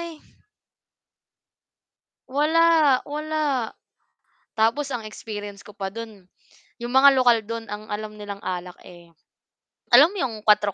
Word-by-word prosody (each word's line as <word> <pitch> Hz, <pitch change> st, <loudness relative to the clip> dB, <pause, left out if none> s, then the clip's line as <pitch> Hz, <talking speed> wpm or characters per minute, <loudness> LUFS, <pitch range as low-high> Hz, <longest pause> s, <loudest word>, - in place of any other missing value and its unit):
eh. 335 Hz, -2 st, -7 dB, 2.1 s
Wala, 305 Hz, 0 st, +3 dB
wala. 295 Hz, -4 st, -2 dB, 0.9 s
Tapos 230 Hz, +6 st, +1 dB
ang 245 Hz, -5 st, -5 dB
experience 205 Hz, -2 st, -8 dB
ko 210 Hz, -, -13 dB
pa 195 Hz, -1 st, -4 dB
do'n, 220 Hz, -4 st, -9 dB, 0.6 s
'yong 240 Hz, -, -5 dB
mga 265 Hz, +2 st, +7 dB
lokal 245 Hz, -3 st, +5 dB
do'n 230 Hz, -1 st, -6 dB
ang 210 Hz, +1 st, -7 dB
alam 215 Hz, 0 st, -6 dB
nilang 200 Hz, -1 st, -7 dB
alak, 180 Hz, -1 st, -5 dB
eh, 175 Hz, -1 st, -16 dB, 0.8 s
alam 290 Hz, +8 st, +8 dB
mo 410 Hz, -, -8 dB
'yong, 250 Hz, -4 st, -1 dB
kuwatro 210 Hz, -1 st, +3 dB
230 Hz, 125 wpm, -23 LUFS, 205-285 Hz, 2.1 s, alam